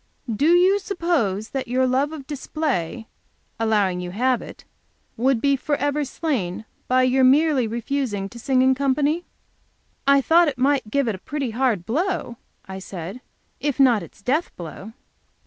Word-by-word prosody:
"Do 285 +8 +2
you 375 +3 +4
suppose 330 - -1
that 265 -2 -4
your 255 +2 +1
love 265 +4 +1
of 300 -4 -8
display, 260 - -3 0.5
allowing 205 -5 +1
you 180 0 -5
have 245 +6 +1
it, - - -11 0.5
would 255 +1 +2
be 280 +3 +2
forever 290 +1 -1
slain 235 - -3 0.2
by 255 0 +3
your 255 +1 +3
merely 275 -1 +4
refusing 235 -3 -2
to 235 - -11
sing 260 +1 +2
in 260 0 +5
company?" 285 +5 0 0.8
"I 280 0 +6
thought 330 +5 +5
that 290 -5 -2
might 270 -3 +1
give 280 +3 +1
it 225 - 0
a 190 - -8
pretty 275 +1 -4
hard 230 -7 0
blow," 295 - -2 0.3
I 190 0 -6
said, 190 +4 -7 0.4
"if 290 -2 -2
not 245 -6 +5
its 170 +3 -13
death 295 +10 0
blow." 185 +5 -9
260 Hz, 160 wpm, -23 LUFS, 220-290 Hz, 0.8 s, I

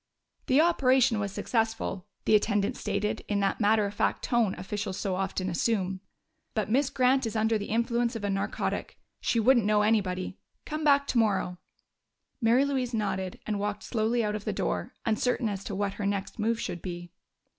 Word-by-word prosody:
"The 265 +2 +4
operation 260 -8 +3
was 200 -1 -2
successful," 225 -3 -1 0.2
the - - +3
attendant 205 -1 +2
stated, 210 +1 -2
in 205 -1 0
that 195 +3 0
matter 215 0 +4
of 200 - -4
fact - - 0
tone 235 -5 +1
officials 195 0 -4
so 195 -2 -1
often 190 0 -2
assume, 190 0 0 0.5
"but 215 -1 -1
Miss 270 +3 +3
Grant 255 -1 +2
is 225 - -5
under 220 +1 +2
the 205 -1 -2
influence 235 +1 0
of 225 - -5
a 205 - 0
narcotic. 195 0 -2 0.2
She 230 - +1
wouldn't 240 +1 +5
know 210 0 +3
anybody.... 190 -4 0 0.3
Come 305 +1 -4
back 285 -1 +4
tomorrow." 205 -8 +1 0.8
Mary 240 +4 +4
Louise 260 -4 -1
nodded 190 -4 -2
and 210 -2 -2
walked 205 0 -3
slowly 230 +1 0
out 210 -1 -1
of 210 -1 -4
the - - -1
door, - - -2
uncertain 235 +2 +1
as 200 -2 -3
to 200 - -4
what 200 0 -1
her 200 - -3
next 200 +2 -3
move 225 +2 +1
should 175 -6 -4
be. 175 -1 -6
215 Hz, 180 wpm, -28 LUFS, 200-235 Hz, 0.8 s, wouldn't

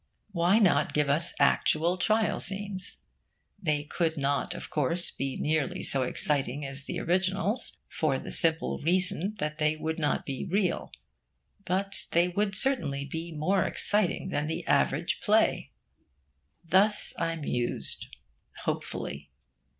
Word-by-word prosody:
Why 175 +2 +3
not 205 -5 +3
give 150 -1 +2
us 160 +4 0
actual 155 +4 +3
trial 215 +3 +2
scenes? 195 -1 -4 0.6
They 150 -5 +1
could 160 +1 -1
not, 140 0 0
of - - -8
course, 155 +5 +1
be 135 -1 -3
nearly 155 -2 0
so 135 - 0
exciting 140 +1 -1
as 135 +1 -7
the 175 - -3
originals, 190 +6 0
for - - 0
the - - -7
simple 165 -2 0
reason 185 +3 +1
that 150 -3 -3
they 155 0 +2
would 160 +1 -3
not 150 - 0
be 135 -2 -3
real; 190 -2 0 0.8
but 195 +2 -1
they 170 +1 +5
would 200 +2 0
certainly 190 - 0
be 165 +4 -5
more 165 +5 +1
exciting 205 -3 0
than 150 -4 -1
the 160 - -3
average - - +1
play. - - +2 1.0
Thus 200 +5 +3
I 165 0 0
mused, 125 -6 -2 0.6
hopefully. - - -3
165 Hz, 135 wpm, -29 LUFS, 150-190 Hz, 1.0 s, they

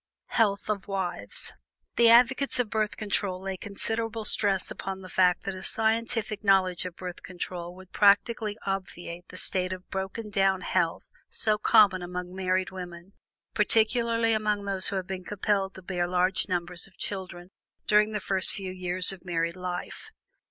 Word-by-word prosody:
HEALTH 205 -4 +1
OF 210 -2 -2
WIVES. 180 - -3 0.4
The 235 -1 +6
advocates 250 +4 +4
of 235 -4 0
Birth 215 -1 -1
Control 200 -3 -2
lay 190 0 -4
considerable 225 +3 -2
stress 195 -4 +4
upon 190 0 -5
the 185 - -10
fact 180 -1 +3
that 195 - -3
a 185 - -8
scientific 225 0 -1
knowledge 190 -3 +3
of 175 - -10
Birth 180 -1 -7
Control 175 -1 -6
would 185 0 -14
practically 210 +1 +3
obviate 180 -2 -5
the 180 - -10
state 185 0 +1
of 185 0 -7
broken 195 +3 -4
down 195 -1 +2
health 175 -3 0 0.3
so 215 -2 +1
common 205 -4 +5
among 180 0 -6
married 185 0 -1
women, 180 0 -9 0.4
particularly 230 +1 +3
among 210 -2 0
those 195 -1 +1
who - - -1
have 190 -1 -2
been 185 -1 -6
compelled 200 -1 -1
to 190 - -11
bear 175 -1 -2
large 180 +2 +1
numbers 175 0 -2
of 190 - -23
children 180 -2 -6 0.3
during 210 +1 +4
the 210 - -2
first 190 -1 +3
few 190 -2 -5
years 185 0 +1
of 190 -2 -10
married 170 -1 -2
life. 180 -1 -6
190 Hz, 165 wpm, -27 LUFS, 180-210 Hz, 0.4 s, The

